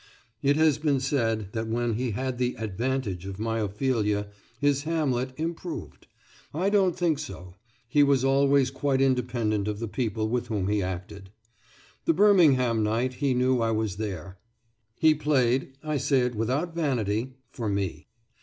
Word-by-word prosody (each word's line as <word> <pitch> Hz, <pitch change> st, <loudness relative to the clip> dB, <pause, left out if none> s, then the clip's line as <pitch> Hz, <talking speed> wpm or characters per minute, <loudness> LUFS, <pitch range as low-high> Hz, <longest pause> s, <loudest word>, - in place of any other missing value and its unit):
It 140 Hz, +1 st, +3 dB
has 155 Hz, -1 st, +3 dB
been 145 Hz, -3 st, +1 dB
said 115 Hz, -7 st, 0 dB
that 110 Hz, -1 st, -2 dB
when 120 Hz, +1 st, 0 dB
he 125 Hz, +3 st, -1 dB
had 130 Hz, +3 st, -3 dB
the 125 Hz, 0 st, 0 dB
"advantage" 110 Hz, -3 st, -2 dB
of 95 Hz, -1 st, -6 dB
my 115 Hz, +1 st, -1 dB
Ophelia 105 Hz, -1 st, 0 dB, 0.3 s
his 145 Hz, -1 st, +2 dB
Hamlet 140 Hz, -5 st, -1 dB
"improved." 165 Hz, +1 st, -5 dB, 0.5 s
I 185 Hz, +5 st, +1 dB
don't 190 Hz, -4 st, +3 dB
think 165 Hz, -5 st, +1 dB
so; 90 Hz, -12 st, -8 dB, 0.3 s
he 145 Hz, +4 st, +3 dB
was 140 Hz, -2 st, +3 dB
always 135 Hz, 0 st, +3 dB
quite 135 Hz, 0 st, 0 dB
independent 120 Hz, -6 st, +1 dB
of 105 Hz, -1 st, -2 dB
the 115 Hz, +1 st, -4 dB
people 110 Hz, -2 st, -2 dB
with 120 Hz, +1 st, -1 dB
whom 100 Hz, -4 st, -1 dB
he 105 Hz, 0 st, +1 dB
acted. 95 Hz, +2 st, -6 dB, 0.8 s
The 165 Hz, -, +4 dB
Birmingham 150 Hz, -, +5 dB
night 115 Hz, +4 st, 0 dB
he 135 Hz, 0 st, 0 dB
knew 125 Hz, 0 st, +2 dB
I 115 Hz, -, +1 dB
was 110 Hz, -3 st, -1 dB
there. 95 Hz, -3 st, -5 dB, 0.6 s
He 160 Hz, -1 st, +5 dB
played 135 Hz, -4 st, +1 dB
I 155 Hz, -1 st, -1 dB
say 135 Hz, 0 st, +2 dB
it 125 Hz, 0 st, 0 dB
without 130 Hz, +10 st, -1 dB
vanity 130 Hz, -6 st, -1 dB, 0.2 s
for 115 Hz, -5 st, -3 dB
me. 100 Hz, -2 st, -3 dB
125 Hz, 160 wpm, -27 LUFS, 110-140 Hz, 0.8 s, Birmingham